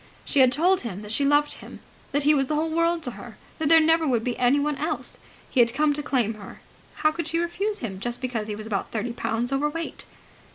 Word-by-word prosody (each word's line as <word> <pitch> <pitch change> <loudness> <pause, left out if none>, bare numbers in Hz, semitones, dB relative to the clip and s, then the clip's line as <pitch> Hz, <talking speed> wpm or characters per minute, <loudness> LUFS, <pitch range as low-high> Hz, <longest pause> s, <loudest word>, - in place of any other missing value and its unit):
She 285 - +1
had 255 -1 +6
told 360 +7 +3
him 210 -4 -6
that 210 - -7
she 280 - 0
loved 290 +1 +3
him, - - -11 0.3
that 285 +1 +1
he 300 +2 +5
was 270 -2 +2
the 305 - -1
whole 320 +1 0
world 335 0 +1
to 250 - -3
her, - - -11 0.2
that 310 -2 0
there 325 0 +8
never 325 0 +3
would 240 -4 +1
be 245 -1 -1
anyone 285 +4 +2
else. - - -3 0.3
He 265 - -1
had 235 0 +4
come 300 +1 +3
to 295 - -2
claim 245 -6 0
her. 210 -2 -11 0.4
How 310 0 +2
could 335 0 -4
she 330 +1 -1
refuse 390 +5 -1
him 195 -6 -5
just 240 +3 -3
because 240 -4 -3
he 210 - -3
was 215 +1 -8
about 205 -3 -2
thirty 230 +2 -3
pounds 235 +2 -2
overweight? 295 +4 -2
280 Hz, 240 wpm, -25 LUFS, 235-315 Hz, 0.4 s, there